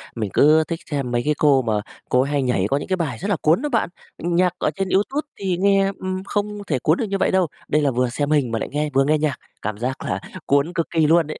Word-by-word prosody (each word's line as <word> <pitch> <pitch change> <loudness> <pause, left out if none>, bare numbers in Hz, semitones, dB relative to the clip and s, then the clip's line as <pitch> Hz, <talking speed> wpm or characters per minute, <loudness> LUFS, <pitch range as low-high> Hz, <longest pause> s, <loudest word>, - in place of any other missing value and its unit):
mình 110 -4 -2
cứ 155 +2 +5
thích 165 0 -3
xem 135 -4 -2
mấy 120 0 +1
cái 150 - +3
cô 140 -3 +4
mà 110 -3 0 0.3
cô 125 - +4
ấy 140 +2 -1
hay 145 -1 +1
nhảy 125 -7 +1
có 140 - +2
những - - -5
cái 190 - +1
bài 140 -9 -2
rất 200 - -4
là 200 - +2
cuốn 160 - +3
á 295 - -2
bạn. 230 -8 +1 0.3
Nhạc 175 +1 +1
ở - - +1
trên 195 -1 -2
YouTube 270 +11 0
thì 185 -3 -1
nghe, 195 0 +3
ừm, 185 0 -3
không 205 +1 -3
thể 135 -5 0
cuốn 155 +7 +2
được 225 - -1
như 195 -1 -2
vậy - - +1
đâu. 185 -3 +3 0.2
Đây 150 +1 +2
là 140 -2 +2
vừa 125 0 +1
xem 145 +4 -2
hình 140 -6 +2
mà 115 - -1
lại - - -4
nghe 150 +1 -1
vừa 135 0 +4
nghe 155 +1 +3
nhạc, 150 -3 0 0.3
cảm 105 0 -3
giác 130 +4 -3
là 95 - -1 0.3
cuốn 140 +5 +2
cực 165 - -1
kỳ 160 -3 +2
luôn 165 -1 +4
ấy. 155 - -7
155 Hz, 285 wpm, -22 LUFS, 135-185 Hz, 0.3 s, cứ